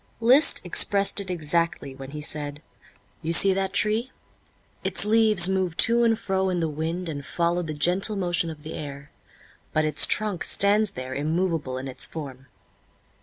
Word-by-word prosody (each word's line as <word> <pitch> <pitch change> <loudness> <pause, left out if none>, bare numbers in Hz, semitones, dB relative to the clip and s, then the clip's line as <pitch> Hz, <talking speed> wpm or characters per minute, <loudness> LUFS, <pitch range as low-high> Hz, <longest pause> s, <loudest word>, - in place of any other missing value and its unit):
Liszt 255 +7 +3
expressed 200 +3 +2
it 190 - -9
exactly 165 -4 -2
when 135 0 -10
he 150 +1 -8
said: 145 0 -2 0.6
"You 160 - -3
see 195 +3 +7
that 190 0 -2
tree? 215 +5 +1 0.7
Its - - -1
leaves 215 -4 +5
move 190 -3 -2
to 235 +1 +4
and 225 -1 +2
fro 190 -2 -1
in 180 -1 -2
the 165 - -1
wind 160 +4 -4
and 145 -3 -6
follow 170 +3 -1
the 155 -3 -6
gentle 180 +7 0
motion 175 -3 -2
of 150 -2 -10
the 160 - -8
air; 145 -1 -9 0.6
but 155 0 +1
its 155 0 +4
trunk 210 -5 0
stands 205 +1 +2
there 130 0 -6
immovable 155 -2 -2
in 130 +1 -6
its 130 - +3
form." 135 -4 -9
170 Hz, 170 wpm, -24 LUFS, 150-195 Hz, 0.7 s, see